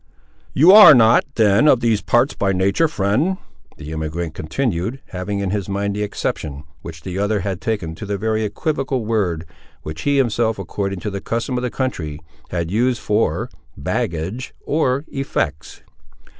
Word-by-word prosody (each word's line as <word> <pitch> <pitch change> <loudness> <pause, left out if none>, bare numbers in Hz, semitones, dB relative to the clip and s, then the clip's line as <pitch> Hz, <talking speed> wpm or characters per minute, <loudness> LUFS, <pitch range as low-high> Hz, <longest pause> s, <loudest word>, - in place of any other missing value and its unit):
"You 160 +7 +7
ar' 210 -7 +10
not, 115 -1 +5
then, 110 +6 +4
of 130 - +5
these 115 -3 +1
parts 120 +4 +2
by 100 -1 0
natur', 100 - +2
friend," 150 - 0 0.4
the 75 0 -8
emigrant 80 +1 -4
continued, 110 - -2
having 100 +1 -4
in 95 -2 -2
his 100 -1 -3
mind 100 0 -2
the 105 - -3
exception 75 -8 -3 0.2
which 80 -2 -10
the 95 +1 -4
other 105 0 0
had 95 -2 -4
taken 100 -8 -2
to 85 +5 -8
the 100 0 -2
very 110 +2 -1
equivocal 135 +3 -2
word, 95 -7 -1 0.4
which 75 0 -6
he 145 0 +1
himself, 115 -3 +1
according 100 0 -4
to 105 - -3
the 100 0 -5
custom 115 +4 -2
of 125 - -1
the 125 - -1
country, 85 - -3 0.3
had 85 -1 -3
used 120 +3 +1
for 105 -7 0 0.3
"baggage," 90 +10 -3
or 140 -2 0
"effects." 80 - -3
105 Hz, 165 wpm, -20 LUFS, 90-125 Hz, 0.4 s, ar